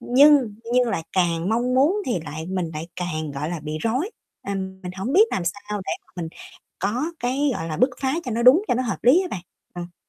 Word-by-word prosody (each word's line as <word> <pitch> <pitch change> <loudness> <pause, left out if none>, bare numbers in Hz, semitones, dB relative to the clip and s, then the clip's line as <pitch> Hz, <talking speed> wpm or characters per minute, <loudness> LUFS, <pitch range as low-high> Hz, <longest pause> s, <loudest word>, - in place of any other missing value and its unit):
Nhưng 270 -3 +5 0.2
nhưng 250 -1 +4
lại 165 - -1
càng 175 -1 +1
mong 240 +3 +1
muốn 290 +9 +4
thì 215 -9 0
lại 155 +1 -6
mình 180 -2 -2
lại 155 +2 -5
càng, 155 -4 -3
gọi 140 +3 -4
là, 175 -2 -4
bị 150 +1 -4
rối, 255 - -1 0.4
ừm, 190 -1 -4
mình 180 -1 -5
hổng 195 +8 -2
biết 395 +7 +7
làm 180 - -1
sao 180 +4 -3 0.2
để - - -1
mà - - -40
mình 170 -2 -3 0.5
có 215 +9 0 0.2
cái, 270 +4 +1
gọi 165 - -4
là, 155 - -3
bức 255 - +4
phá 265 0 +1
cho 250 - -3
nó 235 +1 0
đúng, 260 +10 +7
cho - - +3
nó 255 - 0
hợp 230 -6 -2
lý 270 +11 +6
á 370 - -4
bạn, 175 - -4 0.3
ừm. 175 0 -7
200 Hz, 240 wpm, -23 LUFS, 170-255 Hz, 0.5 s, biết